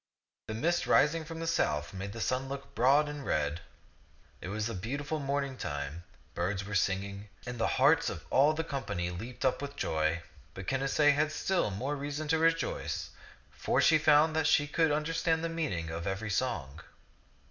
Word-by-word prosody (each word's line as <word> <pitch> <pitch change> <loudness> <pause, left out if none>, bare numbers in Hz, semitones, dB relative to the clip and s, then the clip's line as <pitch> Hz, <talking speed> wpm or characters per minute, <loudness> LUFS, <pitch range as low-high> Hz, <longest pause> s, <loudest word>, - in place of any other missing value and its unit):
The 110 - -4
mist 170 +9 0
rising 155 +3 +4
from 165 +1 -7
the 165 - -3
south 75 - 0
made 95 +1 -5
the 115 - -7
sun 130 +3 -1
look 140 0 -7
broad 140 +5 +4
and 145 -1 -6
red. 75 - -1 0.8
It - - -6
was 105 +2 -2
the 115 - -2
beautiful 140 +10 -3
morning 140 -1 -2
time; 75 - -5 0.3
birds 95 +3 -2
were 105 - -6
singing, 100 +2 -1 0.2
and 125 -1 -5
the 115 - +2
hearts - - +4
of - - -7
all 145 +3 +5
the 160 +1 -2
company 100 - -3
leaped 115 +9 -6
up 130 - +1
with 140 0 -5
joy; 80 +2 0 0.3
but 95 - -7
Canacee 135 +4 +3
had 150 +1 +1
still 175 - 0
more 125 +9 -2
reason 145 +2 -4
to 160 0 +3
rejoice, 165 0 0 0.4
for - - 0
she 155 -1 +5
found 155 +1 +5
that 160 -1 +2
she 145 -2 +4
could 160 +1 +2
understand 160 +2 0
the 165 - -1
meaning 135 - -2
of 85 +3 -4
every 100 +3 -2
song. 80 - -2
135 Hz, 180 wpm, -31 LUFS, 95-150 Hz, 0.8 s, all